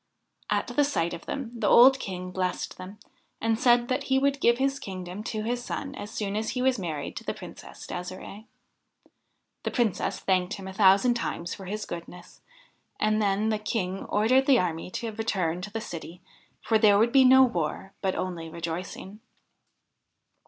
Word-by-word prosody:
At - - 0 0.2
sight 170 - 0
of 170 - -9
them 270 -5 -4
the 225 -3 -1
old 265 +2 +7
King 180 -3 -5
blessed 180 0 -3
them, 190 +3 -9 0.4
and 225 0 0
said 240 -1 +4
that 265 +2 -1
he 265 - +2
would 275 +1 +1
give 235 0 +4
his 275 +1 0
kingdom 185 +1 -7
to 215 -3 -3
his 240 +2 -2
son 275 +2 -5
as 205 -5 -7
soon 205 -3 -3
as 215 +1 -1
he 250 +1 -2
was 260 -3 +2
married 155 -6 -4
to - - -6
the - - -3
Princess - - -11
De'sire'e. 185 +4 -7 1.2
The - - -2
Princess 235 -6 0
thanked 185 -2 0
him 195 -1 -9
a 190 - -7
thousand 200 +4 +5
times 175 -7 -3
for 195 - -9
his 210 +3 -4
goodness, 175 +1 -9 0.6
and 215 0 +2
then 205 +1 +1
the 215 -1 0
King 195 -3 -3
ordered 255 +6 +3
the 270 -3 +6
army 170 -4 -1
to 225 +4 -4
return 190 -6 -1
to 205 +3 -7
the 225 - -3
city, 175 -3 -8 0.4
for 220 -1 +2
there 210 -2 +6
would 230 +3 +3
be 270 +1 +6
no 260 +1 +8
war, 190 -3 -2
but 190 -1 0
only 175 -3 -4
rejoicing. 170 +5 -6
210 Hz, 180 wpm, -27 LUFS, 180-240 Hz, 1.2 s, no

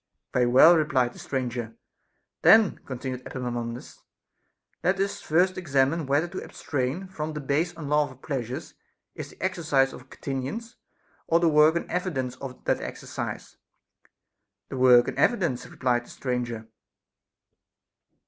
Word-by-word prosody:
Very 125 -1 +3
well, 135 +8 +8
replied 130 -6 +1
the - - -13
stranger. 120 -4 -3 0.7
Then, 220 -3 +6
continued 130 -1 -5
Epaminondas, 120 -2 -5 0.8
let 190 +1 +2
us 195 +1 -1
first 180 +4 +2
examine 140 -1 +1
whether 145 +5 +2
to 185 - -6
abstain 145 +6 -3
from 155 -4 -5
the 150 - -4
base 150 +5 0
unlawful 150 -3 0
pleas 130 -4 -4
ures 130 - -6 0.4
is - - -7
the - - -12
exercise 155 -8 +1
of 130 +1 -12
continence, 145 - -5 0.5
or 165 - +4
the 170 -1 +3
work 155 +1 +5
and 170 - -2
evi 180 +1 -2
dence 130 -1 -2
of 130 -1 -9
that - - +1
exercise - - -6 0.5
\ 100 -1 -57
The 135 - -5
work 125 -1 +6
and - - -4
evidence, 170 - +1
replied 120 -1 0
the - - -17
stranger. 120 -3 -3
135 Hz, 140 wpm, -26 LUFS, 125-165 Hz, 0.8 s, well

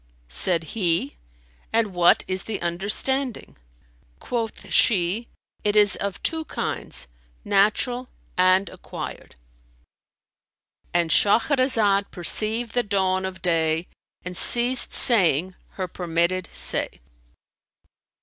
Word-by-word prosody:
Said 165 - +2
he, 170 -9 0 0.6
"And 220 -3 0
what 175 -1 +3
is 185 0 -2
the 215 -3 -4
understanding?" 205 - -2 0.6
Quoth 230 -2 -5
she, 200 +3 +2 0.4
"It 205 0 0
is 205 -1 +4
of 200 -1 -5
two 320 -1 -1
kinds, - - -4 0.4
natural 215 +5 0 0.3
and 185 +1 +3
acquired."—And - - -9
Shahrazad 215 - +2
perceived 215 +6 +1
the 245 - +2
dawn 190 -3 -1
of 185 0 -8
day 165 -1 0 0.4
and 180 0 -6
ceased 245 +6 +4
saying 185 - +4 0.2
her 185 -1 -4
permitted 175 +1 -2
say. - - +1
190 Hz, 95 wpm, -23 LUFS, 170-225 Hz, 0.6 s, is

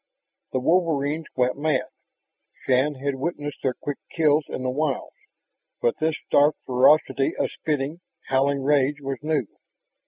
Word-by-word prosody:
The 130 - 0
wolverines 160 -1 +1
went 125 +1 +1
mad. 150 -3 +1 0.8
Shann 135 +3 +2
had 140 +1 -2
witnessed 145 +1 -4
their 130 -2 0
quick 145 -1 -5
kills 150 -2 +2
in 130 - -5
the 130 - 0
wilds, 145 -1 -2 0.7
but 120 - 0
this 155 0 0
stark 145 +2 +4
ferocity 135 +2 +3
of - - 0
spitting, 150 +2 -3 0.2
howling 135 +1 +1
rage 145 0 +2
was 135 -1 -4
new. 150 -4 0
145 Hz, 135 wpm, -24 LUFS, 135-155 Hz, 0.8 s, stark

